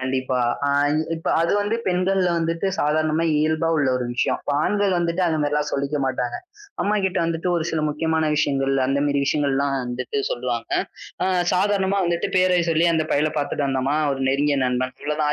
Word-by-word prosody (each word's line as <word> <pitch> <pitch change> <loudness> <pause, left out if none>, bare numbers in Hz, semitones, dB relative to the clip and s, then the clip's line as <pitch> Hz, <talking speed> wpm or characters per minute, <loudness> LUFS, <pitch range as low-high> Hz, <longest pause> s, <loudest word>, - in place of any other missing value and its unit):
கண்டிப்பா. 130 0 -1 0.3
அ - - +2 0.5
இப்ப 165 - -9
அது 170 - +1
வந்து 205 +2 0
பெண்கள்ல 185 0 +1
வந்துட்டு 165 +2 -1
சாதாரணமா 155 +2 +1
இயல்பா 160 +2 +1
உள்ள 145 -3 +2
ஒரு 125 - -2
விஷயம். 120 - 0 0.2
ஆண்கள் 200 +3 +1
வந்துட்டு 170 +1 0
அது 160 -2 +1
மாரிலாம் 150 0 0
சொல்லிக்க 140 +1 -1
மாட்டாங்க. 130 -2 -2 0.5
அம்மா 210 +1 +1
கிட்ட 190 0 0
வந்துட்டு 165 +2 -2
ஒரு 160 - -1
சில 160 -1 -1
முக்கியமான 160 +1 0
விஷயங்கள் 135 -2 +1
அந்த 135 +1 0
மாரி 140 0 +1
விஷயங்கள்லாம் 140 -1 +1
வந்துட்டு 125 +2 -3
சொல்லுவாங்க. 120 -1 -3 0.5
ஆ - - +1 0.3
சாதாரணமா 195 +1 +1
வந்துட்டு 170 +2 -1
பேரை 185 -1 +3
சொல்லி 165 +1 +3
அந்தப் 155 -1 -1
பையல 150 +2 +2
பாத்துட்டு 145 0 -1
வந்தாமா, 135 +2 0 0.2
ஒரு 135 - -4
நெருங்கிய 145 +1 +1
நண்பன். 125 0 -1
இவ்ளோதான் 150 0 0
150 Hz, 170 wpm, -22 LUFS, 140-170 Hz, 0.5 s, பேரை